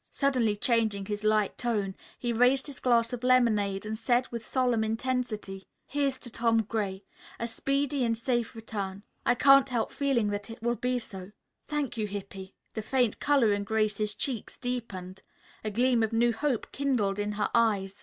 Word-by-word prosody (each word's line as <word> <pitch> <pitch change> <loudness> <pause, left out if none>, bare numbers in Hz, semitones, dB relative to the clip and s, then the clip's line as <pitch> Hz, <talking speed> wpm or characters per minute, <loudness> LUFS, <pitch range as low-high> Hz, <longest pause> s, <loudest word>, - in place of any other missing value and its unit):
Suddenly 255 -7 +1
changing 220 -3 +1
his 210 +1 -4
light 215 -1 +2
tone, 210 -6 0 0.2
he 240 -1 -2
raised 250 +4 +3
his 285 -3 -9
glass 235 -1 +2
of 245 0 -5
lemonade 215 -6 +3
and 215 +1 -3
said 245 +2 +2
with 235 -1 -5
solemn 245 -2 +1
intensity: 220 -4 -3 0.2
"Here's 280 -2 0
to 240 - -9
Tom 230 -1 +2
Gray; 205 -3 -3 0.4
a 235 - -2
speedy 275 +3 0
and 230 -1 +1
safe 240 -1 -1
return. 200 -3 -5 0.2
I 240 - +5
can't 275 +1 +6
help 240 -3 -1
feeling 265 -7 +1
that 205 +1 -4
it 225 0 -10
will 240 0 +2
be 250 +1 -1
so." 195 -4 -8 0.3
"Thank 295 -5 -2
you, 215 -1 -1
Hippy." 195 -1 -7 0.2
The 220 - -3
faint 245 0 +1
color 275 -7 +3
in 205 0 -1
Grace's 215 0 0
cheeks 250 -6 -3
deepened. 195 -7 -5 0.4
A 215 - -1
gleam 240 +2 +2
of 220 0 0
new 235 +1 +3
hope 255 0 -1
kindled 235 -8 0
in 205 0 -1
her 210 0 -1
eyes. 205 -5 +2
230 Hz, 175 wpm, -29 LUFS, 205-250 Hz, 0.4 s, can't